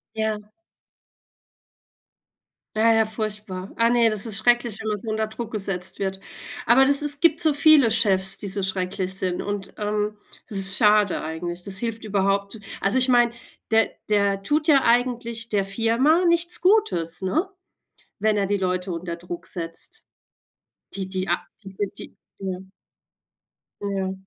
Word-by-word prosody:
Ja. 215 -1 -3 2.3
Ja 225 +1 +4
ja, 225 0 +4
furchtbar. 210 -3 -5
Ah, 230 0 +3
ne, 235 -2 +4
das 215 +1 +3
ist 210 -3 -1
schrecklich, 240 -1 +1
wenn 220 - -7
man 210 -1 -1
so 225 - -8
unter 220 0 -1
Druck 220 +1 -7
gesetzt 195 -4 -2
wird. 190 -1 -3 0.5
Aber 245 +3 +6
das 280 +1 +3
ist 290 -1 +4
es 290 - -15
gibt 330 -1 +4
so 315 -3 +5
viele 285 -4 +5
Chefs, 195 -3 +2
die 205 - -7
so 195 0 -2
schrecklich 185 0 -2
sind, 180 -2 -2
und, 200 -1 -5
ähm, 210 0 -2 0.3
das 205 - -1
ist 195 0 +4
schade 210 -2 +3
eigentlich. 175 +2 -5
Das 195 -1 -1
hilft 230 -1 -4
überhaupt 200 +1 -1 0.2
also 200 +7 +4
ich 255 - +4
meine, 240 -2 +4 0.4
der 225 0 +3 0.2
der 200 -2 +1
tut 300 +4 0
ja 275 -3 +5
eigentlich 235 -1 0
der 200 -2 0
Firma 235 - +2
nichts 340 +1 +3
Gutes, 360 - +1
ne? 320 - 0 0.7
Wenn 215 +1 +1
er 200 -1 +1
die 205 +1 0
Leute 185 0 -2
unter 170 0 -4
Druck 175 0 -8
setzt. 170 - -4 0.9
Die 195 -1 -4
die 190 0 -4
a - - +2 0.3
die 195 - -9
sind 195 +1 -5
die - - -11 0.2
ja. 190 -2 -4 1.2
Ja. 195 -2 -2
210 Hz, 160 wpm, -23 LUFS, 190-235 Hz, 2.3 s, Aber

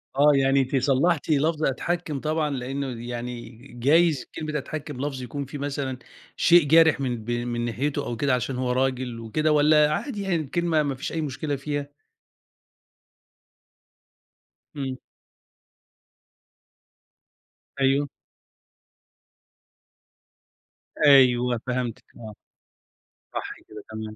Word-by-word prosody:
آه 145 +2 +6
يعني 135 0 +3
أنتِ 135 +1 -2
صلحتِ 140 +5 +2
لفظ 155 +1 +1
أتحكَّم، 155 +2 -1
طبعًا 155 +1 -1
لأنه 130 -2 -4
يعني 120 -1 -6 0.2
جايز 150 +2 +3
كلمة 155 -1 -3
أتحكم 150 -2 -6
لفظ 135 -2 -3
يكون 140 +3 -5
فيه 145 +3 -7
مثلًا 140 -2 -3 0.4
شيء 175 -1 +6
جارح 160 -1 +5
من 120 -5 -2
ب 120 - -4
من 120 0 -2
ناحيته 140 +5 -2
أو 120 - -3
كده، 140 +2 +1
علشان 125 +1 -1
هو 125 -1 -1
راجل 130 -2 -1
وكده، 150 +8 0
والّا 150 0 +5
عادي 220 - -3
يعني 195 -3 0
الكلمة 160 +1 0
ما 140 -2 -2
فيش 130 - -5
أي 165 - -2
مشكلة 145 0 -3
فيها؟ 145 +1 -4 2.9
إمم. 135 -2 -4 2.8
أيوه. 140 +2 +3 3.0
أيوه، 125 -3 +5
فهمتِك 125 -2 -2
آه 110 -2 -9 1.0
صح - - -4
كده 105 -1 -10
تمام. 110 0 -6
140 Hz, 110 wpm, -25 LUFS, 125-150 Hz, 3.0 s, آه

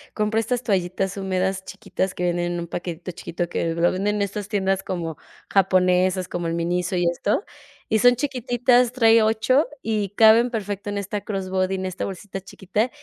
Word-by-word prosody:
compro 215 +1 +1
estas 245 +2 -1
toallitas 190 -2 -1
húmedas 190 -1 -1
chiquitas 190 -1 -4
que 180 - -3
venden 175 0 0
en 175 - -3
un - - -4
paquetito 175 +1 -5
chiquito 175 0 -4
que 165 -1 -1
lo 170 +1 +3
venden 200 +3 -1
en 210 - -1
estas 200 0 -4
tiendas 195 -2 0
como 170 -5 -4 0.3
japonesas, 185 -1 +2
como 175 -1 -3
el 165 - -1
Miniso 175 +2 -1
y 175 -1 +1
esto, 200 - 0 0.4
y 220 - +2
son 245 +2 +6
chiquititas, 245 -2 +2
trae 225 -2 +5
8 220 +7 +2 0.2
y 215 -3 -1
caben 225 +3 +6
perfecto 205 -3 -4
en 205 - -3
esta 200 +1 -3
cross 195 -3 -4
body, 190 0 +1
en 190 0 -3
esta 185 -1 -3
bolsita 195 0 -6
chiquita, 205 +5 -2
195 Hz, 185 wpm, -23 LUFS, 180-220 Hz, 0.4 s, son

